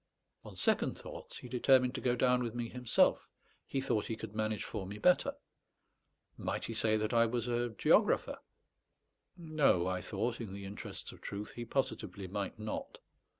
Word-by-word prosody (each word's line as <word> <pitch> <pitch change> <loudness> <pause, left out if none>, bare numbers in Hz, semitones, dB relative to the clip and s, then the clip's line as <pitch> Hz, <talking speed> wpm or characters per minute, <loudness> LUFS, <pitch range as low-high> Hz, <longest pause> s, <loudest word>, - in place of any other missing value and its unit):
On - - -10
second - - +2
thoughts - - -7
he - - -9
determined 125 0 +4
to - - -4
go 125 -1 +2
down 125 0 +3
with 120 -1 -3
me 120 -1 -2
himself; 125 -2 +2 0.4
he 135 - -1
thought 120 -5 0
he 115 - -2
could 110 -1 -8
manage 110 0 -1
for 95 - -5
me 100 +2 -6
better. 180 +11 +3 1.0
Might - - -2
he 115 - -4
say 110 -1 +2
that 110 +1 -1
I 115 0 +5
was 120 0 -1
a 120 0 0
geographer? 110 - +3 1.0
No; 155 - +2
I 90 0 -1
thought, 120 +7 -2
in 105 -4 -6
the 100 0 -7
interests 100 +1 -6
of - - -15
truth, 100 +1 -5
he 120 - -6
positively 110 -7 -2
might 100 +2 -3
not. 110 0 -5
115 Hz, 175 wpm, -34 LUFS, 105-125 Hz, 1.0 s, I